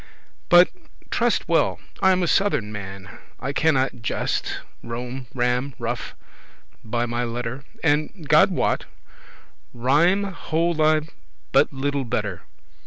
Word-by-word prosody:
But, 175 +1 +8 0.4
truste - - +1
well, - - +2 0.2
I 190 - +5
am 185 -1 +2
a - - +1
southern 180 - +1
man, 95 -2 -8 0.2
I 135 +2 -3
cannot 135 -6 +1
gest,* 110 - -1 0.2
rom, 125 +2 -6
ram, 125 +2 0
ruf, 120 0 -4 0.7
<1> 110 - -16
by 120 +1 0
my 120 +1 -2
letter; 120 0 -3
*relate 130 +3 -8 0.2
stories 150 -1 +2
And, 165 -7 -12
God - - +6
wot, - - 0 0.9
rhyme 155 +11 +3
hold 170 -3 -1
I 155 0 +4 0.5
but - - +4
little 140 0 -1
better. 105 -6 -3
130 Hz, 135 wpm, -23 LUFS, 120-155 Hz, 0.9 s, But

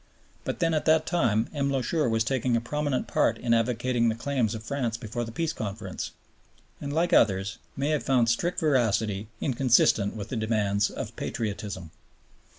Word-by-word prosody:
But - - -2
then 165 -2 +1
at 155 - 0
that 155 0 +4
time 115 -11 +1
M. 140 -2 0
Loucheur 140 +2 0
was 110 0 +2
taking 125 0 +1
a - - +2
prominent 145 +3 -1
part 115 - +2
in 115 0 +1
advocating 120 +1 +2
the 110 - -1
claims 120 -2 -1
of 110 - -7
France 120 -2 -2
before 120 0 -4
the 115 - -6
Peace 160 +6 -1
Conference, 100 - -5 0.7
and, 140 - -4
like 170 +4 +1
others, 100 0 +3 0.2
may 140 +2 0
have 150 -2 +1
found 125 -3 +2
strict 170 +10 0
veracity 110 -8 +1
inconsistent 120 -6 +3
with 105 0 -6
the - - -3
demands 105 -2 +1
of - - -6
patriotism. 100 -6 -4
115 Hz, 170 wpm, -27 LUFS, 110-140 Hz, 0.7 s, that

